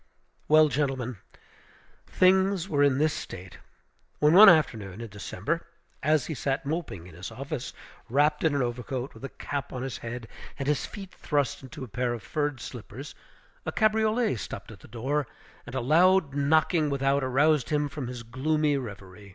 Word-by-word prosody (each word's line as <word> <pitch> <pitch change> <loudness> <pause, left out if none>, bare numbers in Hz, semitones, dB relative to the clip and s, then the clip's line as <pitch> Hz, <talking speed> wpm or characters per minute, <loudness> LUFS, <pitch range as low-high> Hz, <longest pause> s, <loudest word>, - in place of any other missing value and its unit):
Well, 155 0 +6
gentlemen, 130 -4 -1 0.9
things 190 0 +3
were 145 -6 +1
in 140 -2 +4
this 155 +1 +2
state, 90 -1 -8 0.6
when, 150 +1 +4
one 205 +3 +11
afternoon 110 - +2
in 115 -1 -6
December, 105 - -4 0.3
as 150 -1 +2
he 160 - -4
sat 140 +1 -2
moping 145 - -4
in 90 - -13
his 90 +4 -7
office, 135 +3 -5 0.4
wrapped 145 +5 +2
in 160 -3 +2
an 140 - +2
overcoat, 125 +2 -4
with - - -14
a 135 - -4
cap 140 +1 -5
on 125 -1 -4
his 135 -2 -5
head 115 0 -6 0.3
and 135 - -4
his 150 -1 0
feet 195 -3 -9
thrust 145 -1 -1
into 130 -1 -9
a - - -6
pair 120 +3 -1
of 115 - -10
furred 145 0 -2
slippers, 125 +4 -8 0.5
a - - -3
cabriolet 220 - +2
stopped 100 0 -7
at 105 - -12
the - - -15
door, 135 +5 -2 0.4
and 120 - -7
a 130 - 0
loud 165 +3 +4
knocking 155 +2 +2
without 140 0 +1
aroused 135 +1 +2
him 150 -1 +1
from 140 -2 -5
his 125 -1 -6
gloomy 145 +5 0
revery. 100 -5 -9
140 Hz, 175 wpm, -27 LUFS, 120-155 Hz, 0.9 s, one